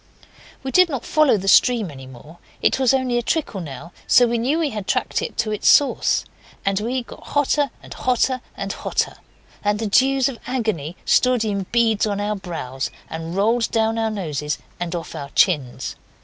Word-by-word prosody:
We 265 - -3
did 365 +2 +5
not 270 -6 -4
follow 305 -7 +4
the 195 0 -5
stream 225 -3 +4
any 135 -2 -11
more. 145 +7 -14 0.2
It - - +2
was 260 -3 +4
only 260 -2 +1
a - - -1
trickle 235 - -2
now, 155 +2 -8 0.2
so 245 - +6
we 235 0 0
knew 265 +7 +1
we 320 -3 0
had 210 -3 -5
tracked - - 0
it - - -5
to 225 -1 0
its 210 - -1
source. 285 - +4 0.4
And 195 0 +1
we 245 +4 -2
got - - -13
hotter 290 0 +1
and - - -9
hotter 255 0 0 0.2
and 200 0 -3
hotter, - - -2 0.5
and 205 0 +1
the 225 - -3
dews 265 +5 +3
of 255 -5 -5
agony 215 - -2
stood 250 -3 +3
in 200 -3 -2
beads 225 -3 +2
on 205 -1 -2
our 210 +1 -1
brows 160 -9 -5 0.2
and 165 +1 -5
rolled 225 +4 +2
down 225 0 +1
our 225 0 +1
noses 150 -8 -3 0.2
and 175 0 -3
off 170 - -6
our 140 - -6
chins. 145 -10 +1
220 Hz, 190 wpm, -21 LUFS, 180-250 Hz, 0.5 s, so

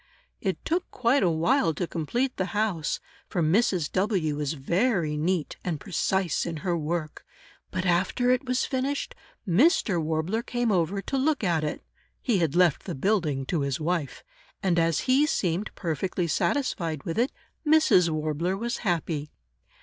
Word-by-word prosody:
It - - -3
took 350 +3 -1
quite 250 +3 +2
a 180 - +3
while 165 - +2
to 180 - -1
complete 235 - -2
the 185 +3 -3
house, 200 -8 0 0.3
for 175 - 0
Mrs. 175 -1 +2
W. 185 -6 +1
was 150 0 -2
very 170 - 0
neat 165 +2 -1
and 165 -5 -2
precise 190 -3 0
in 165 -2 -4
her 175 -2 +1
work, 160 -1 -3 0.5
but 185 0 -3
after 185 +8 +2
it 255 +2 +2
was 250 0 +1
finished, 270 +2 -2 0.3
Mr. 195 - +3
Warbler 160 +8 -1
came 240 -1 -1
over 190 +2 0
to 270 - -2
look 285 -2 +1
at 170 -5 +1
it 150 - -3 0.4
(he 230 -7 +1
had 165 -3 0
left 175 -4 +3
the 175 - -4
building 150 -5 0
to 160 +2 -1
his 140 +2 -1
wife!), 160 -2 -2 0.4
and 175 -3 +2
as 165 -1 +2
he 265 +4 +3
seemed 185 - 0
perfectly 175 +2 -2
satisfied 170 - -1
with 165 +6 -2
it, 250 +3 +2 0.3
Mrs. 300 - +5
Warbler 155 +4 -1
was 235 +4 -2
happy. 165 -6 -1
180 Hz, 160 wpm, -27 LUFS, 160-225 Hz, 0.5 s, Mrs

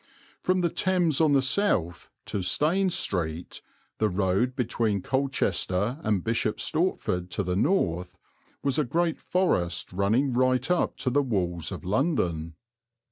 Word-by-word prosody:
From 185 0 +1
the 170 -2 +1
Thames 175 -5 +1
on 155 -2 +4
the 135 -1 +4
south 130 - 0 0.2
to 100 - -3
Stane 160 - +2
Street, 85 - -3 0.4
the 110 - +2
road 95 +6 0
between 110 -6 0
Colchester 125 - 0
and 105 - 0
Bishop 115 -1 0
Stortford, 150 - -1
to 95 +3 -2
the 90 0 -1
north, 90 - 0 0.5
was 140 0 +1
a - - +3
great 165 +5 0
forest 90 - 0
running 110 +8 +1
right 130 +3 +2
up 180 - +1
to 130 - -1
the 145 +3 +3
walls 90 - -2
of 95 -1 -7
London. 90 - 0
115 Hz, 140 wpm, -27 LUFS, 90-150 Hz, 0.5 s, on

